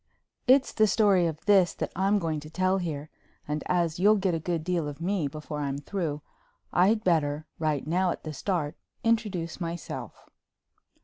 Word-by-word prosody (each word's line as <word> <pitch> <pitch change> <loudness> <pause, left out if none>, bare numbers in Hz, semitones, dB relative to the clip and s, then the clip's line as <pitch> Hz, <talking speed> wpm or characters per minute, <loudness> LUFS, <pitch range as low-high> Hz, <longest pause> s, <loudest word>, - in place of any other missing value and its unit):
It's 265 +2 +5
the 215 -1 +4
story 200 -5 +4
of 160 -1 -6
this 195 -4 +4
that - - -3
I'm 195 +3 +2
going 160 -5 -1
to 150 +1 -10
tell 185 +3 +1
here, 155 -4 -4 0.4
and 150 0 -2
as 170 -2 +1
you'll 210 +3 +6
get 190 -3 +1
a 165 - 0
good 165 0 -2
deal 170 -3 -1
of 145 0 -7
me 175 -2 0
before 150 +1 -6
I'm 140 -1 -2
through, 150 -2 -3 0.5
I'd 210 +5 +4
better, 155 -4 +1
right 155 -3 0
now 180 +4 +1
at - - -4
the 155 - -5
start, 160 -1 -2 0.3
introduce 205 -8 0
myself. 170 -1 -6
170 Hz, 175 wpm, -28 LUFS, 155-190 Hz, 0.5 s, you'll